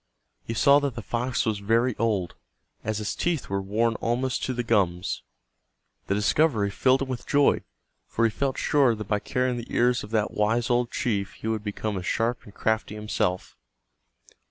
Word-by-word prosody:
He 115 - -5
saw 140 +5 +6
that 140 -4 -2
the 115 - -6
fox 120 +3 -1
was 110 -3 0
very 115 +4 +2
old, 105 -6 0 0.5
as 110 0 -2
its 105 - -2
teeth 170 -5 -1
were 100 0 -1
worn 110 +4 +1
almost 125 +2 -1
to 130 - -2
the 120 - -1
gums. 95 -5 0 0.9
The 100 - +1
discovery 105 -1 +2
filled 130 +5 +3
him - - -5
with 130 -2 -5
joy, 145 -1 +3 0.5
for 115 - +1
he 115 - +2
felt 135 +4 -1
sure 135 -6 +3
that 105 -2 -7
by 105 -1 +1
carrying 125 +2 -1
the 120 - -7
ears 125 +1 +2
of 105 - -8
that 110 -1 0
wise 115 +4 +1
old 120 0 +2
chief 100 -7 -1
he - - -7
would 110 -2 -1
become 105 0 -3
as 90 - -7
sharp 115 +2 0
and 105 - -14
crafty 110 -1 -1
himself. 105 -4 -2
115 Hz, 185 wpm, -26 LUFS, 105-125 Hz, 0.9 s, saw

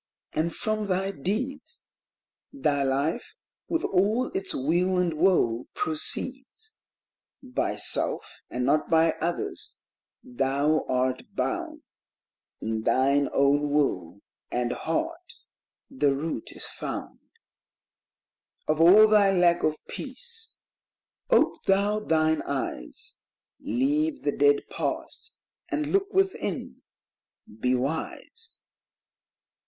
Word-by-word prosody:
and 165 +2 -1
from 215 -1 -1
thy 190 +1 0
deeds 255 - -3 0.7
Thy 150 - 0
life, 140 +3 -1 0.3
with 330 -1 -1
all 210 +7 +2
its 190 0 -2
weal 175 +7 +1
and 180 -2 +1
woe, 155 -9 +2
proceeds; 265 - -1 0.6
By 255 -1 -1
self, - - 0
and 125 0 -2
not 150 +3 +2
by 165 0 +5
others, 170 +2 -3 0.5
thou 140 +5 +1
art 130 0 -1
bound; - - -2 0.8
In 110 0 -2
thine 140 +4 +3
own 145 +1 +3
will 100 - 0 0.3
and 120 0 0
heart 330 - -3 0.5
the 145 - +1
root 145 -5 -3
is - - -5
found - - -6 1.5
Of 155 +1 +2
all 200 +6 +9
thy 210 -2 +5
lack 175 -2 +4
of 155 0 +1
peace; 460 -2 -3 0.7
ope - - +3
thou 200 +2 +3
thine 160 -5 +2
eyes, 430 0 -4 0.4
Leave 290 +3 0
the 145 - 0
dead 145 0 +3
past, 450 - -4 0.3
and 305 -2 -1
look 395 +1 +2
within; 385 0 -1 0.8
be 125 +2 +2
wise. 160 - -4
175 Hz, 105 wpm, -27 LUFS, -, 1.5 s, all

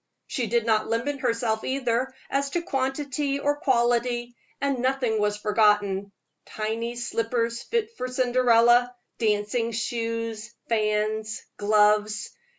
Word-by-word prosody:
She 245 -4 -2
did 235 0 +1
not 215 -2 +2
limit 270 +5 -1
herself 230 -3 0
either 260 -1 0 0.2
as 275 0 0
to 340 +4 -2
quality 275 -1 -1
or 290 +1 0
quantity, 240 -3 +1 0.2
and 280 -2 0
nothing 255 -3 +1
was 210 0 +1
forgotten 210 -2 +2 0.3
tiny 225 +2 -3
slippers 235 0 -1
fit 460 -1 -2
for 255 - -3
Cinderella, 245 -1 +4 0.2
dancing 220 +2 0
shoes, 230 0 -3
fans, 215 0 0
gloves. 210 +1 +2
235 Hz, 115 wpm, -25 LUFS, 215-255 Hz, 0.3 s, Cinderella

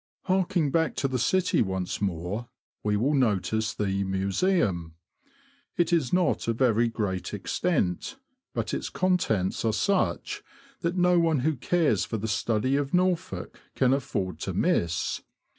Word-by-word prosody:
Harking 185 -5 +1
back 160 0 +1
to 135 - 0
the 130 -1 -2
city 185 +10 +2
once 95 -2 -2
more, 100 +5 -2 0.3
we 105 -1 +1
will 135 +8 +1
notice 110 -4 +1
the 100 -1 -1
Museum. 95 - 0 0.8
It 175 0 +2
is 155 -7 +2
not 180 -8 +1
of 115 -1 0
very 120 -2 +3
great 105 -4 -3
extent, 115 - -1 0.4
but - - -2
its - - -2
contents 165 - 0
are 115 - +2
such 200 - 0 0.4
as 170 +1 -1
no 180 -1 +4
one 165 -5 +2
who 155 +3 +1
cares 140 - +1
for 110 - -3
the 110 +1 -3
study 115 +5 +1
of 145 +3 -1
Norfolk 180 -1 -1 0.2
can 130 -1 +3
afford 115 -9 -2
to - - -3
miss. 85 +1 0
120 Hz, 145 wpm, -27 LUFS, -, 0.8 s, no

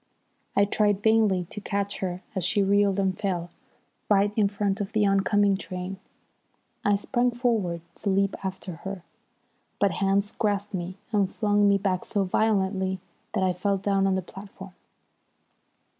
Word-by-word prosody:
I 200 - +5
tried 205 0 +1
vainly 215 -5 +3
to 210 - -6
catch 200 0 -2
her 185 -1 -3
as 190 -4 -2
she 200 +3 +2
reeled 200 0 +3
and 190 -1 +1
fell 175 -3 -2 0.6
right 205 0 +3
in 205 -3 +3
front 200 0 -1
of 195 - -4
the 215 -1 +3
oncoming 200 0 +3
train. 185 0 -6 0.8
I 205 - +3
sprang 240 +4 +1
forward 225 -9 0 0.2
to 205 - -2
leap 195 0 +2
after 190 -2 -5
her, 190 0 -7 0.8
but 200 -1 +3
hands 195 +3 +1
grasped 205 0 -1
me 185 0 -4
and 200 -3 +2
flung 205 -1 +3
me 200 - +4
back 190 -2 -1
so 200 - 0
violently 190 -1 +1 0.3
that 195 - +1
I 185 -1 +2
fell 195 +2 0
down 195 0 +1
on 190 - +2
the 190 - -1
platform. 195 0 -11
195 Hz, 160 wpm, -26 LUFS, 190-205 Hz, 0.8 s, I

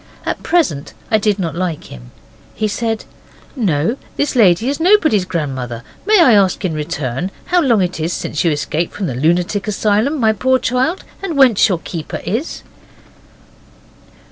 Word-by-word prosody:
At - - -3
present 230 - 0 0.2
I 220 - +4
did 210 -1 +1
not 170 -5 -2
like 170 -3 -4
him. - - -11 0.5
He 215 - 0
said, 225 +1 -2 0.5
'No, 195 - 0 0.2
this 285 -1 -1
lady 210 -1 +4
is 280 +2 -1
nobody's 320 - +4
grandmother. 130 -9 -4 0.2
May 430 -1 +5
I 265 -9 +6
ask 195 -2 +2
in 175 - -1
return 150 0 -3 0.2
how 355 0 +2
long 235 - +3
it 180 -1 -3
is 160 +2 -1
since - - -2
you 170 - +3
escaped 150 +3 -2
from 200 - -3
the 135 - -2
lunatic 175 - 0
asylum, 215 +8 +1
my 220 -2 +3
poor 260 +5 +2
child, 255 +9 -1 0.2
and 350 -7 -3
whence 250 -7 +5
your 185 - +1
keeper 165 -1 -6
is? 240 - -3
200 Hz, 165 wpm, -17 LUFS, 165-255 Hz, 0.5 s, I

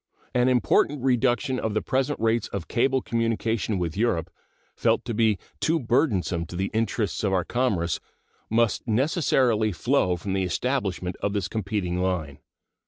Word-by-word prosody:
An 125 0 +3
important 130 +2 +2
reduction 130 +1 +1
of 110 -1 -2
the 110 - +2
present 135 +2 0
rates 115 0 +1
of 100 -4 -5
cable 130 +2 +1
communication 115 -2 -1
with 85 -3 -2
Europe, 90 -6 0 0.4
felt - - +1
to 120 - -3
be 110 -2 +2 0.2
too 165 +1 +2
burdensome 105 - +1
to 90 - -8
the 95 +2 -2
interests 110 -1 -1
of 100 -2 +1
our 90 -2 +1
commerce, 95 -10 0 0.5
must 115 0 +1
necessarily 120 - +2
flow 100 -2 +1
from 95 +3 -4
the 95 - +1
establishment 95 -2 -1
of 100 - -2
this 100 -3 -1
competing 95 -4 -2
line. 85 -7 -2
110 Hz, 155 wpm, -25 LUFS, 95-125 Hz, 0.5 s, An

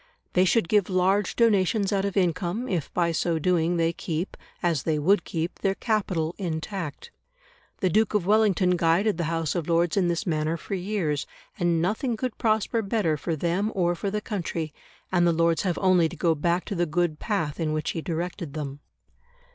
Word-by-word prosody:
They 185 +1 +4
should 215 0 +2
give 205 0 +2
large 190 +2 +2
donations 205 -2 +2
out 195 0 +1
of 200 0 -2
income, 185 +5 0
if 170 - -2
by 170 -1 +1
so 165 0 0
doing 170 +1 +1
they 165 0 +1
keep, 170 +2 -4 0.3
as 165 -5 +1
they 155 0 0
would 175 +6 +3
keep, 165 +2 -4
their 195 -1 0
capital 185 -8 -1
intact. 175 - -4 0.7
The 185 - +3
Duke 215 +2 +2
of 200 -4 +1
Wellington 195 -3 +3
guided 175 +5 +2
the 170 - 0
House 165 -1 -1
of 170 -2 -3
Lords 170 0 +2
in 190 -3 +2
this 170 -1 -1
manner 155 -1 0
for 185 - -7
years, 180 -6 -1 0.3
and 170 -2 +2
nothing 220 +5 -1
could 255 -1 -3
prosper 220 +1 +1
better 195 -6 0
for 160 +3 -2
them 175 +7 0
or 175 -2 +2
for 185 +3 -3
the 210 +1 -2
country, 170 -7 -4 0.4
and 175 -1 +3
the - - +4
Lords 165 0 +2
have 180 -4 -1
only 180 -4 +3
to 175 - -9
go 165 +1 +2
back 170 +4 0
to 210 - -4
the 175 -2 0
good 155 0 0
path 180 -10 -2
in 160 -2 0
which 155 0 -1
he 165 - -4
directed 170 -2 -4
them. 145 -2 -5
175 Hz, 195 wpm, -26 LUFS, 165-200 Hz, 0.7 s, They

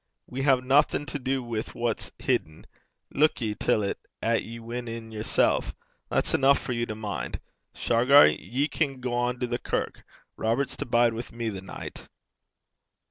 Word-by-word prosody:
We 130 +2 -5
hae 135 -2 +4
naething 135 +3 +3
to 145 +1 -4
do 130 0 -1
wi' 115 -2 -2
what's 120 -1 -2
hidden. 80 0 -1 0.5
Luik 155 +2 +3
ye 110 -4 -1
till 105 0 +1
't 100 - -2 0.2
'at 115 0 +2
ye 115 +1 -8
win 120 +1 -5
in 115 -1 -6
yersel'. 110 -1 +2 0.5
That's - - 0
eneuch 140 +1 +5
for 125 - -4
you 120 0 -1
to 110 - -4
min'. 105 -2 -4 0.4
Shargar, 125 +5 +6
ye 135 +5 0
can 140 -5 -1
gang 125 0 -1
to 125 - 0
the 120 0 -2
kirk. - - -3 0.3
Robert's 115 +5 0
to - - -4
bide 120 -1 +4
wi' 115 - -3
me 115 -1 -3
the 95 -3 -6
nicht.' 95 - -9
120 Hz, 170 wpm, -27 LUFS, 115-130 Hz, 0.5 s, Shargar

